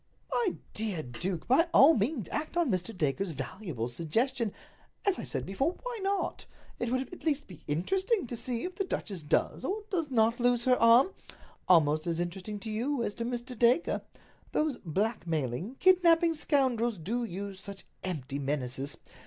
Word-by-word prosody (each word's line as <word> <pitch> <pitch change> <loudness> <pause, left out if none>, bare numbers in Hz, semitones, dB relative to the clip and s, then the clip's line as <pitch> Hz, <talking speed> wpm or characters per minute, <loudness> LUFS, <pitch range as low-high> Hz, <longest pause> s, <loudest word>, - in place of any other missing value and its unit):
"My 455 -7 +1 0.2
dear 205 -7 -1
duke, 160 +8 -4
by 300 +7 +5
all 295 +4 +9
means 230 - 0
act 310 +3 -3
on 335 -8 +2
Mr. 185 +4 -1
Dacre's 155 +5 0
valuable 160 - -4
suggestion. 215 - 0 0.5
As 395 -2 +2
I - - -4
said - - -3
before, 270 - 0
why - - -4
not? 395 +1 -1 0.3
It 240 -1 -1
would 255 +5 -1
at - - -10
least 295 -3 0
be 170 -5 -13
interesting 375 - +1
to 240 - -5
see 235 0 -3
if 365 - -4
the 390 - -1
duchess 200 - -4
does 150 +9 0
or 410 +9 -2
does 335 -6 0
not 230 -1 +3
lose 245 -1 +3
her 255 0 +5
arm—almost 180 - +3
as 165 -1 0
interesting 185 +4 -4
to 220 - -4
you 240 +4 -1
as 205 - -2
to 230 +2 -4
Mr. 245 +1 -4
Dacre. 245 +8 +3 0.5
Those 305 -4 0
blackmailing, 170 - -2
kidnaping 340 -1 +5
scoundrels 255 -7 +1
do 225 +9 -2
use 200 -2 -5
such 200 0 -9 0.2
empty 145 -7 -3
menaces. 135 -2 -2
230 Hz, 165 wpm, -30 LUFS, 175-285 Hz, 0.5 s, all